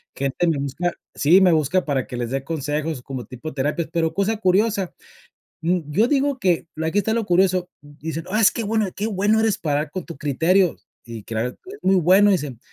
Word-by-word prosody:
gente 140 Hz, +5 st, -1 dB
me 160 Hz, -3 st, +1 dB
busca, 140 Hz, +6 st, -2 dB, 0.2 s
sí, 165 Hz, +6 st, +5 dB
me 180 Hz, -2 st, +5 dB
busca 160 Hz, +4 st, +1 dB
para 135 Hz, -4 st, -1 dB
que 125 Hz, -, -6 dB
les 120 Hz, -1 st, -3 dB
dé 135 Hz, 0 st, -2 dB
consejos 150 Hz, -1 st, -3 dB
como 130 Hz, -2 st, -6 dB
tipo 130 Hz, +5 st, -8 dB
terapias. 150 Hz, +5 st, -1 dB
Pero, 165 Hz, -1 st, 0 dB
cosa 200 Hz, +3 st, 0 dB
curiosa, 200 Hz, 0 st, +1 dB, 0.7 s
mm, 175 Hz, +2 st, +1 dB
yo 220 Hz, +10 st, +3 dB
digo 280 Hz, -1 st, +1 dB
que, 180 Hz, -6 st, +1 dB, 0.2 s
aquí 160 Hz, +4 st, -2 dB
está 205 Hz, +2 st, +1 dB
lo 230 Hz, -2 st, -1 dB
curioso, 180 Hz, 0 st, +2 dB
dicen: 155 Hz, +2 st, -7 dB
"ah, 215 Hz, +3 st, +1 dB
es 220 Hz, -, +6 dB
que 230 Hz, -, -3 dB
bueno, 215 Hz, -1 st, 0 dB
que 205 Hz, -, -2 dB
bueno 210 Hz, +2 st, +2 dB
eres 220 Hz, -2 st, +1 dB
para 145 Hz, -2 st, 0 dB
ayudar 150 Hz, -1 st, -5 dB
con 185 Hz, -3 st, -4 dB
tu 170 Hz, -, -8 dB
criterio" 165 Hz, +6 st, +2 dB, 0.3 s
y 115 Hz, -3 st, -9 dB
claro, 115 Hz, +2 st, -2 dB
"es 390 Hz, -, -13 dB
muy 190 Hz, +1 st, +3 dB
bueno", 190 Hz, +4 st, +5 dB
dicen. 145 Hz, -, -2 dB
170 Hz, 205 wpm, -22 LUFS, 145-195 Hz, 0.7 s, es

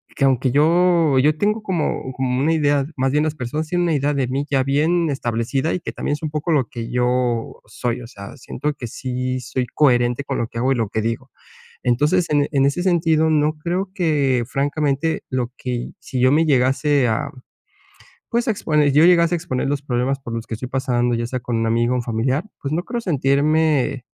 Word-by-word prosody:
que 140 Hz, -, +2 dB
aunque 130 Hz, -1 st, +2 dB
yo 165 Hz, +1 st, +3 dB
yo 150 Hz, +3 st, +3 dB
tengo 210 Hz, +3 st, 0 dB
como 170 Hz, -8 st, -2 dB
como 125 Hz, -1 st, -1 dB
una 150 Hz, +4 st, +2 dB
idea 145 Hz, -3 st, +2 dB
más 135 Hz, 0 st, +1 dB
bien, 150 Hz, +1 st, +3 dB
las 155 Hz, -1 st, -2 dB
personas 150 Hz, +4 st, -3 dB
tienen 175 Hz, +1 st, +1 dB
una 170 Hz, -, +1 dB
idea 145 Hz, +1 st, 0 dB
de 135 Hz, -3 st, 0 dB
mí, 135 Hz, +3 st, -2 dB
ya 135 Hz, -2 st, +3 dB
bien 160 Hz, +5 st, +1 dB
establecida, 130 Hz, +3 st, -1 dB
y -, -, -1 dB
que -, -, -6 dB
también -, -, -2 dB
es 150 Hz, -, -5 dB
un 155 Hz, -, -1 dB
poco 155 Hz, +3 st, -2 dB
lo 140 Hz, -7 st, +2 dB
que 115 Hz, -2 st, -6 dB
yo 125 Hz, -1 st, 0 dB
soy. 120 Hz, +2 st, -3 dB
O 120 Hz, -, -9 dB
sea, 100 Hz, 0 st, -10 dB
siento 145 Hz, +3 st, -4 dB
que 125 Hz, -4 st, -7 dB
sí 130 Hz, +2 st, -3 dB
soy 125 Hz, 0 st, -3 dB
coherente 125 Hz, -2 st, +2 dB
con 135 Hz, -, -3 dB
lo 115 Hz, -, -1 dB
que 115 Hz, -, -6 dB
hago 130 Hz, +3 st, +1 dB
y -, -, -2 dB
lo 115 Hz, -4 st, -1 dB
que 110 Hz, -, -2 dB
digo. 115 Hz, +1 st, -3 dB, 0.5 s
Entonces 150 Hz, +9 st, +2 dB
en 145 Hz, -1 st, +3 dB
en 135 Hz, -2 st, +3 dB
ese 140 Hz, +6 st, 0 dB
sentido, 165 Hz, -3 st, +2 dB
no 155 Hz, 0 st, +1 dB
creo 180 Hz, +5 st, -2 dB
que 145 Hz, -, +1 dB
francamente, 145 Hz, +2 st, -1 dB
lo 125 Hz, -2 st, -2 dB
que 125 Hz, -, -5 dB
y 120 Hz, 0 st, -4 dB
si 130 Hz, -2 st, -4 dB
yo 130 Hz, +1 st, +5 dB
me 160 Hz, +3 st, +4 dB
llegase, 135 Hz, 0 st, +2 dB
ah, 115 Hz, +5 st, -1 dB, 1.0 s
pues, 235 Hz, 0 st, 0 dB
a -, -, +4 dB
exponer 150 Hz, -7 st, +1 dB
yo 150 Hz, +3 st, +5 dB
llegase 170 Hz, -1 st, +5 dB
a -, -, +2 dB
exponer 130 Hz, -6 st, -2 dB
los 145 Hz, 0 st, -1 dB
problemas 135 Hz, 0 st, -1 dB
por 120 Hz, -3 st, -6 dB
los 115 Hz, 0 st, -5 dB
que -, -, -5 dB
estoy 120 Hz, +3 st, -6 dB
pasando, 125 Hz, -2 st, 0 dB
ya 115 Hz, 0 st, -2 dB
sea 125 Hz, +1 st, -4 dB
con 120 Hz, 0 st, -3 dB
un 115 Hz, 0 st, 0 dB
amigo 120 Hz, +2 st, +1 dB
o -, -, +1 dB
un 125 Hz, -, -1 dB
familiar. 125 Hz, +6 st, -1 dB, 0.2 s
Pues, 140 Hz, -, -3 dB
no 175 Hz, -, -1 dB
creo 240 Hz, 0 st, -3 dB
sentirme, 145 Hz, -, +1 dB
135 Hz, 220 wpm, -21 LUFS, 125-155 Hz, 1.0 s, yo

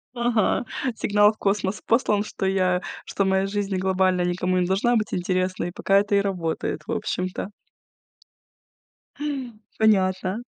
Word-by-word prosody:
Ага, 235 Hz, -1 st, +1 dB, 0.3 s
сигнал 205 Hz, 0 st, +4 dB
в 215 Hz, -, -17 dB
космос 200 Hz, 0 st, -1 dB
послан, 215 Hz, -3 st, +2 dB
что 195 Hz, -, -5 dB
я 185 Hz, -1 st, +1 dB, 0.2 s
что 195 Hz, -, -1 dB
моя 190 Hz, 0 st, +2 dB
жизнь 200 Hz, -1 st, -2 dB
глобально 185 Hz, -1 st, +2 dB
никому 180 Hz, +1 st, 0 dB
не 180 Hz, -, +2 dB
должна 200 Hz, +6 st, +2 dB
быть 215 Hz, -2 st, -1 dB
интересна, 185 Hz, 0 st, -1 dB
и 175 Hz, -, -4 dB
пока 195 Hz, +2 st, +2 dB
это 205 Hz, 0 st, 0 dB
и -, -, +5 dB
работает, 170 Hz, -5 st, -2 dB
в -, -, -4 dB
общем-то. 185 Hz, +2 st, -3 dB, 2.3 s
Понятно. 190 Hz, 0 st, +2 dB
190 Hz, 135 wpm, -24 LUFS, 185-205 Hz, 2.3 s, и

